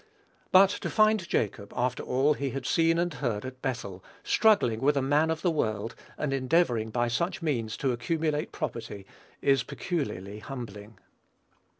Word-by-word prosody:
But 190 +1 +7
to - - -4
find 215 -4 +3
Jacob, 100 -1 -1
after 125 0 0
all 135 +4 +2
he 140 -1 -3
had 135 0 -5
seen 165 +3 +3
and 175 -1 0
heard 120 -6 -2
at 130 0 -8
Bethel, 100 -8 -4 0.2
struggling 205 - +3
with 145 +2 +3
a - - +2
man 145 +4 +3
of 160 0 -2
the 175 - +3
world, 110 -7 -1 0.2
and 145 -3 -1
endeavoring 130 -4 +1
by 120 +2 0
such 170 +9 -1
means 115 -8 -1
to 135 - 0
accumulate 150 +4 -1
property, 100 -2 -5 0.4
is 135 -1 +4
peculiarly 105 - -4
humbling. 110 -4 -8
135 Hz, 160 wpm, -28 LUFS, 115-160 Hz, 0.4 s, But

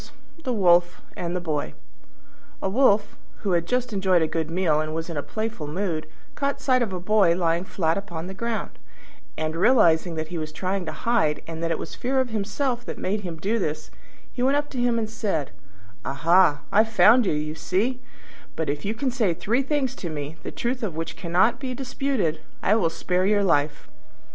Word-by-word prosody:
THE 255 - -1
WOLF 175 -5 +4 0.2
AND 175 0 -3
THE - - 0
BOY 150 - -3 0.8
A - - -1
Wolf, 210 -1 +3 0.3
who 200 - 0
had 170 -1 +1
just 250 0 0
enjoyed 190 -4 +3
a - - +1
good 160 -1 -2
meal 165 -3 +2
and 155 0 -3
was 165 +1 -3
in - - -5
a 145 - -1
playful 215 -4 -4
mood, 165 0 -2 0.3
caught 280 -1 -1
sight 255 -2 +2
of 225 -5 0
a 185 - -3
Boy 185 -2 +3
lying 170 0 +1
flat 165 -1 0
upon 170 -4 -6
the 190 - -6
ground, 230 +3 -4 0.6
and, 155 0 -2
realising 170 -5 +4
that 155 0 -4
he 175 -1 -4
was 155 -1 -5
trying 185 +2 -2
to - - -2
hide, 160 -6 +1
and 165 0 -6
that 165 - 0
it 165 - 0
was - - -7
fear 265 +2 0
of 260 -1 +1
himself 235 +4 -1
that - - -5
made 205 +3 -1
him 175 -4 -6
do 210 +8 0
this, 155 -5 -3 0.4
he 250 - -4
went 270 +3 +3
up 290 0 -2
to 255 - -4
him 240 -1 +2
and 220 -1 -1
said, 205 - -2 0.5
"Aha, 160 +2 +3
I've 220 +2 +4
found 225 +1 +6
you, - - +2
you 150 0 -2
see; 195 +11 -1 0.5
but 160 -3 -1
if 145 0 -5
you 210 +3 -2
can 265 +2 -1
say 215 -9 +1
three 210 +10 +1
things 275 -2 0
to 175 - -4
me, 150 0 -5
the - - -5
truth 250 +1 -2
of 200 -8 -3
which 165 0 -4
cannot 185 +6 +2
be 255 -2 -4
disputed, 250 - -1 0.2
I - - +4
will 190 -7 +3
spare 180 +3 0
your 205 0 +3
life." 150 -4 +1
185 Hz, 205 wpm, -25 LUFS, 160-230 Hz, 0.8 s, found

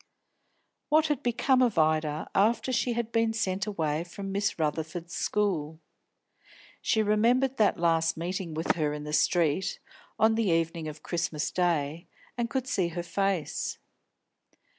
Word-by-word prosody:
What 310 +1 +4
had 295 -4 0
become 255 +2 +2
of 235 -7 +2
Ida, 155 -1 +1
after 225 +6 +2
she 245 0 +1
had 235 -1 -3
been 225 -1 +2
sent 195 -2 -1
away 160 -6 -1
from 195 +3 -7
Miss 200 0 -1
Rutherford's 160 +2 -3
school? 160 -7 -1 1.0
She 220 - +2
remembered 240 +6 +2
that 215 - +3
last 165 -1 +2
meeting 175 -1 -4
with 160 +2 +1
her 150 -2 0
in 150 0 -5
the 150 0 -6
street, 170 +2 +2 0.4
on 220 +1 +4
the 220 -3 +1
evening 165 -1 0
of 155 0 -8
Christmas 165 -3 -2
Day, 170 -2 0 0.3
and 235 -1 -2
could 260 0 -1
see 185 -8 +1
her 170 +1 -4
face. 195 -2 -1
180 Hz, 145 wpm, -28 LUFS, 160-220 Hz, 1.0 s, What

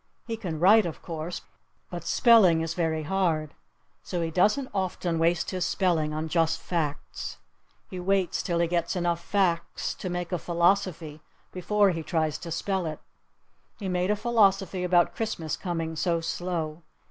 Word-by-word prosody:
He 230 - -3
can 175 -8 -5
write, 200 +3 +6
of 160 - -8
course. 165 +1 -5 0.5
But 175 -2 -5
spelling 185 -4 +5
is 165 0 -2
very 160 -3 -1
hard. 160 -3 0 0.5
So 175 -2 -3
he 165 - -2
doesn't 215 - +2
often 180 -3 -1
waste 165 0 +1
his 185 -2 -2
spelling 165 -6 +1
on 155 +1 -3
just 165 0 +1
facts. 155 -5 -4 0.5
He 185 - -7
waits 190 0 +1
till 170 -2 -1
he 170 0 +2
gets 170 +2 -1
enough 170 -1 -1
facts 175 -4 0
to 185 - -6
make 175 0 -3
a 180 - -1
philosophy 170 -3 0 0.3
before 200 +2 +2
he 165 -2 -3
tries 155 -2 -1
to 175 - -7
spell 185 +2 -1
it: 155 - -5 0.8
He 200 -4 -4
made 180 +1 0
a 210 - +3
philosophy 200 -4 +2
about 175 -1 +3
Christmas 170 -9 -3
coming 165 -3 -3
so 170 +1 +1
slow. 165 -1 -3
175 Hz, 160 wpm, -27 LUFS, 165-190 Hz, 0.8 s, write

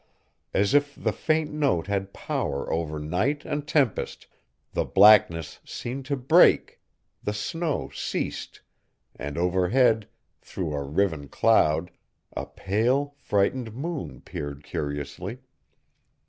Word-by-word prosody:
As 100 +5 +2
if 145 0 +3
the - - -1
faint 155 -1 0
note 140 - +1
had 100 -1 -2
power 70 -6 -3
over 80 -2 -2
night 90 - -1
and 150 -1 -3
tempest, 140 -7 0 0.5
the - - +1
blackness 95 -6 +5
seemed 130 +3 -6
to 140 - -1
break; 130 0 +4 0.4
the 105 - -2
snow 165 +7 -2
ceased, - - -4 0.5
and 70 +1 -6
overhead, 95 +6 +3 0.3
through 85 -5 -4
a 70 - -2
riven 75 0 -1
cloud, 80 -4 +3 0.4
a - - -4
pale, 125 +8 0
frightened 110 +3 0
moon 160 +3 -5
peered 70 0 -6
curiously. 75 - -4
100 Hz, 115 wpm, -26 LUFS, 80-135 Hz, 0.5 s, blackness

